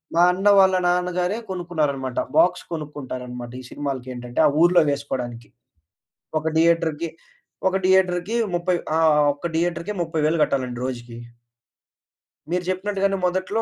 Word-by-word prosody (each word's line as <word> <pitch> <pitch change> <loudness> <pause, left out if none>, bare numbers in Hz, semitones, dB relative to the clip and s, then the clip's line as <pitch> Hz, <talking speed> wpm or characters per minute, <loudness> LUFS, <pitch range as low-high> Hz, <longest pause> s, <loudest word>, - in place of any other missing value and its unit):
మా 170 - +5
అన్న 190 +3 -1
వాళ్ళ 190 -1 +5
నాన్నగారే 180 +2 0
కొనుక్కున్నారన్నమాట. 150 -8 -2 0.2
బాక్స్ 180 0 +4
కొనుక్కుంటారన్నమాట. 130 -5 -6
ఈ - - -13
సినిమాలకేటంటే 130 -3 -3
ఆ - - +4
ఊర్లో 175 -1 +5
వేసుకోడానికి. 125 -5 -4 0.9
ఒక 155 - -5
థియేటర్‌కి 165 -1 +2 0.6
ఒక 190 - -3
థియేటర్‌కి 185 +2 +2 0.2
30 175 +1 0 0.2
ఆ! - - +2 0.3
ఒక్క 145 - -11
థియేటర్‌కి 170 +3 -1
30,000 160 0 0
గట్టాలండి 125 -3 -2
రోజుకి. 120 -2 -6 1.3
మీరు 180 0 0
చెప్పినట్టుగానే 195 +1 0
మొదట్లో 185 +4 0
170 Hz, 115 wpm, -23 LUFS, 135-180 Hz, 1.3 s, మా